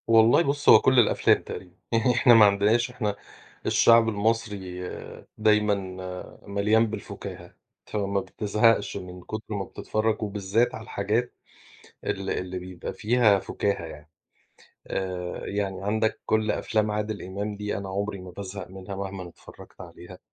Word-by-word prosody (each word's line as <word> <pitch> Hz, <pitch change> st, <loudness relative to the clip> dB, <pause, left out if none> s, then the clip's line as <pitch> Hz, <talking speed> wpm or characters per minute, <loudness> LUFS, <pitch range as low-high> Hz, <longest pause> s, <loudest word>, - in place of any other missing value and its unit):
والله 115 Hz, +5 st, +6 dB
بُص 145 Hz, -1 st, 0 dB
هو -, -, +10 dB
كل 130 Hz, -1 st, +4 dB
الأفلام 115 Hz, -, +4 dB
تقريبًا، 90 Hz, -1 st, -9 dB, 0.2 s
يعني 115 Hz, +2 st, +3 dB
إحنا 120 Hz, 0 st, +6 dB
ما 110 Hz, -2 st, +8 dB
عندناش 105 Hz, +5 st, +3 dB
إحنا 105 Hz, -5 st, -2 dB, 0.5 s
الشعب 115 Hz, -1 st, +5 dB
المصري 100 Hz, -4 st, -2 dB, 0.5 s
دايمًا 105 Hz, -1 st, +3 dB, 0.7 s
مليان 105 Hz, +3 st, +3 dB
بالفُكاهة، 110 Hz, -1 st, -8 dB, 0.3 s
فما 100 Hz, -1 st, -1 dB
بتزهقش 105 Hz, +3 st, +1 dB
من 90 Hz, 0 st, -9 dB
كُتر 110 Hz, +3 st, -6 dB
ما 100 Hz, -2 st, -2 dB
بتتفرج 110 Hz, +3 st, -2 dB
وبالذات 105 Hz, +3 st, 0 dB
على 110 Hz, -, -8 dB
الحاجات 110 Hz, +4 st, -1 dB, 0.7 s
ال 95 Hz, 0 st, -3 dB
اللي 90 Hz, 0 st, -3 dB
بيبقى 90 Hz, -1 st, -7 dB
فيها 110 Hz, -2 st, +3 dB
فُكاهة 100 Hz, -2 st, -2 dB
يعني. 75 Hz, -2 st, -11 dB, 0.8 s
آآ، 90 Hz, -2 st, -4 dB
يعني 100 Hz, -2 st, -3 dB
عندك 110 Hz, +2 st, 0 dB
كُل 110 Hz, -1 st, +1 dB
أفلام 110 Hz, 0 st, 0 dB
عادل 105 Hz, 0 st, -3 dB
إمام 100 Hz, +3 st, -4 dB
دي 105 Hz, 0 st, -3 dB
أنا 100 Hz, 0 st, -5 dB
عمري 100 Hz, +1 st, -3 dB
ما 90 Hz, 0 st, -9 dB
بازهق 95 Hz, +1 st, -7 dB
منها 95 Hz, +1 st, -8 dB
مهمًا 95 Hz, -2 st, -5 dB
اتفرجت -, -, -15 dB
عليها. 90 Hz, +1 st, -11 dB
105 Hz, 140 wpm, -26 LUFS, 95-110 Hz, 0.8 s, هو